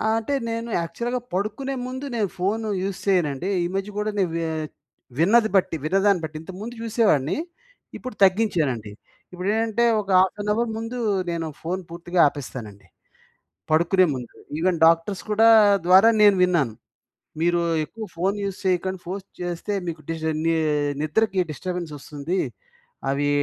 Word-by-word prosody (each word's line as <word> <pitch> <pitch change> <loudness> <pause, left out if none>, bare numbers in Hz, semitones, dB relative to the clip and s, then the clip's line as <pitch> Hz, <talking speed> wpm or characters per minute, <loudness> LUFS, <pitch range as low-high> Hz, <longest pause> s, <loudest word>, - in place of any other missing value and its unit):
అంటే 225 +5 -2 0.2
నేను 230 +1 -3
యాక్చువల్‌గా 235 +10 -3
పడుకునే 215 +8 -2
ముందు 260 +2 -5
నేను 210 -4 0
ఫోన్ 205 +5 0 0.2
యూజ్ 195 -1 -3
చేయనండి. 175 -3 +1
ఈ - - 0
మధ్య 195 +1 -2
కూడా 215 0 -1
నేను 180 -4 +1 0.9
విన్నది 220 +6 +4
బట్టి, 185 -3 +2
విన్నదాన్ని 195 +2 +3
బట్టి, 155 -1 -5
ఇంతకుముందు 195 +8 -8
చూసేవాడిని, 210 - +2 0.6
ఇప్పుడు 255 -3 -8
తగ్గించానండి. 165 - +2 0.4
ఇప్పుడేంటంటే 220 +5 0 0.2
ఒక 200 - -12
హాఫ్ 190 +2 +2
ఏన్ 210 - -3
అవర్ 235 +2 0
ముందు 225 +2 -5 0.3
నేను 165 -1 -2
ఫోన్ 180 +3 -3
పూర్తిగా 175 +1 -3
ఆపేస్తానండి. 125 -8 -7 0.8
పడుకునే 170 +4 +4
ముందు. 125 -2 -8 0.3
ఈవెన్ 180 +1 +1
డాక్టర్స్ 165 +4 +2
కూడా 220 +2 +5 0.4
ద్వారా 190 +5 +7
నేను 205 -1 +7
విన్నాను, 165 -11 +2 0.7
మీరు 175 0 +2 0.2
ఎక్కువ 220 +7 -8
ఫోన్ 190 +4 0
యూజ్ 195 -1 -4
చేయకండి. 185 0 0
ఫోర్స్ 190 +2 -5 0.2
చేస్తే 175 +3 -3
మీకు 160 -2 -5
డిస్ట 160 -1 -1 0.7
నిద్రకి 190 +5 +1
డిస్ట్ర్బెన్స్ 175 +1 -5
వస్తుంది. 150 +6 -4 0.7
అవి 145 +1 +1
185 Hz, 135 wpm, -24 LUFS, 165-210 Hz, 0.9 s, ద్వారా